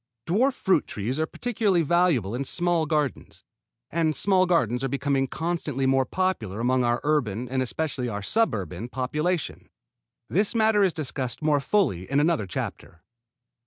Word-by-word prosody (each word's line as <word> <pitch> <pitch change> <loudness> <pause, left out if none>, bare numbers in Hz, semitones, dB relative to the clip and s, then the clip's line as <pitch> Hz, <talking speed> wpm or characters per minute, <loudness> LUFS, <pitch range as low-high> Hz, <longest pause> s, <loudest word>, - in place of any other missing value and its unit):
Dwarf 240 +11 +2
fruit 190 - +1
trees 115 +8 -3
are 160 - 0
particularly 205 -7 0
valuable 160 - +2
in 125 +3 -2
small 175 +1 +1
gardens; 150 -3 -2 0.5
and 160 -1 +1
small 185 -2 +3
gardens 125 -8 +1
are - - +1
becoming 140 0 0
constantly 155 -3 -2
more 135 0 +3
popular 130 - -2
among 125 +2 +2
our 120 0 +1
urban, 125 -7 0
and 130 +1 -1
especially 130 -1 -2
our 105 -2 -4
suburban, 110 - -1
population. 150 +7 -2 0.6
This 205 +5 0
matter 220 -2 +4
is 190 - +3
discussed 135 -3 -4
more 150 -2 +3
fully 135 - 0
in 140 +1 +2
another 150 - +1
chapter. 85 -1 -6
145 Hz, 150 wpm, -25 LUFS, 125-175 Hz, 0.6 s, matter